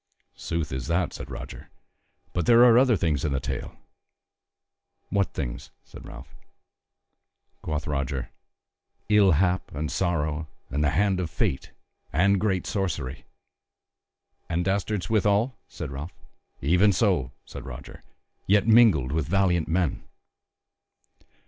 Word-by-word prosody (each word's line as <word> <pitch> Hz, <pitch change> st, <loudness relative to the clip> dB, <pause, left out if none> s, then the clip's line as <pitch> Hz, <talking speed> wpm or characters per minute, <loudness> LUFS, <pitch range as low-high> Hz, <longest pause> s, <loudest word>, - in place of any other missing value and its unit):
"Sooth 85 Hz, -2 st, -3 dB
is 65 Hz, -2 st, -4 dB
that," 85 Hz, +2 st, 0 dB
said -, -, -8 dB
Roger; -, -, -8 dB, 0.6 s
"but 85 Hz, -, -1 dB
there 120 Hz, +1 st, +7 dB
are 120 Hz, -2 st, +7 dB
other 125 Hz, -3 st, +5 dB
things 80 Hz, -5 st, 0 dB
in 75 Hz, -3 st, 0 dB
the 70 Hz, -, 0 dB
tale." -, -, -5 dB, 1.4 s
"What 100 Hz, -1 st, +1 dB
things?" -, -, -5 dB
said -, -, -12 dB
Ralph. -, -, -11 dB, 1.3 s
Quoth 75 Hz, -1 st, -3 dB
Roger: 70 Hz, -3 st, -3 dB, 0.8 s
"Ill 105 Hz, -4 st, +5 dB
hap 90 Hz, +3 st, +1 dB
and 75 Hz, +1 st, -3 dB
sorrow 80 Hz, -3 st, -1 dB, 0.2 s
and 75 Hz, +3 st, 0 dB
the 75 Hz, -, +3 dB
Hand 95 Hz, +4 st, +1 dB
of 90 Hz, -3 st, -2 dB
Fate 65 Hz, -, -2 dB, 0.4 s
and 100 Hz, +3 st, +3 dB
great 95 Hz, -3 st, 0 dB
Sorcery." 75 Hz, -9 st, -3 dB, 1.2 s
"And 85 Hz, +1 st, -1 dB
dastards 100 Hz, 0 st, -1 dB
withal?" 110 Hz, +3 st, +2 dB
said -, -, -7 dB
Ralph. 75 Hz, +6 st, -7 dB, 0.5 s
"Even 90 Hz, +8 st, +4 dB
so," 90 Hz, -, +1 dB
said 65 Hz, -, -9 dB
Roger, 65 Hz, +1 st, -9 dB, 0.5 s
"yet 100 Hz, 0 st, +4 dB
mingled 110 Hz, -, +5 dB
with 80 Hz, -2 st, -1 dB
valiant 90 Hz, -2 st, +2 dB
men. 85 Hz, -1 st, 0 dB
85 Hz, 125 wpm, -26 LUFS, 75-100 Hz, 1.4 s, there